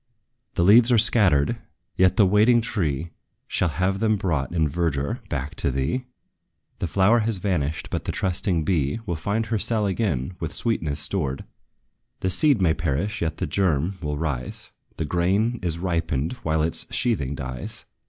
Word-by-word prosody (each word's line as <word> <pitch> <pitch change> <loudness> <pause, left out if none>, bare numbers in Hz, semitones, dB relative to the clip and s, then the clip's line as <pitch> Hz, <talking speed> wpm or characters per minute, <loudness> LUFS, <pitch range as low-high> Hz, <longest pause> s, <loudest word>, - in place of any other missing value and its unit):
The 85 - +2
leaves 115 +6 +6
are 120 - +5
scattered, 95 -10 +3 0.4
yet 95 +3 +3
the 105 - +6
waiting 105 +5 +5
tree 85 - -2 0.4
Shall 90 - 0
have 90 +6 0
them 110 0 +2
brought, 80 -9 -1
in 80 -3 +1
verdure, 70 -3 -1
back 70 0 -3
by - - +1
thee; 70 - -1 0.7
The - - -1
flower 100 +7 +4
has 110 -1 0
vanished, 85 -6 -2
but - - -3
the - - -1
trusting 90 -2 0
bee 75 -3 0
Will 90 - -2
find 100 +8 -1
her 110 0 -1
cell 110 0 +1
again 95 - -1
with 80 -2 -4
sweetness 80 -11 -1
stored. 75 -3 -2 0.8
The 95 - 0
seed 125 +1 +3
may 80 -3 +4
perish, 85 +6 -2
yet 80 -2 -1
the - - -1
germ 90 -2 +1
will 75 -2 -3
rise; 70 -5 -4 0.3
The 80 - -2
grain 100 +9 +1
is 85 -3 -2
ripened 85 - -1
while 80 -1 0
its 80 - -2
sheathing 75 - 0
dies. 65 -2 -6
85 Hz, 165 wpm, -24 LUFS, 75-100 Hz, 0.8 s, leaves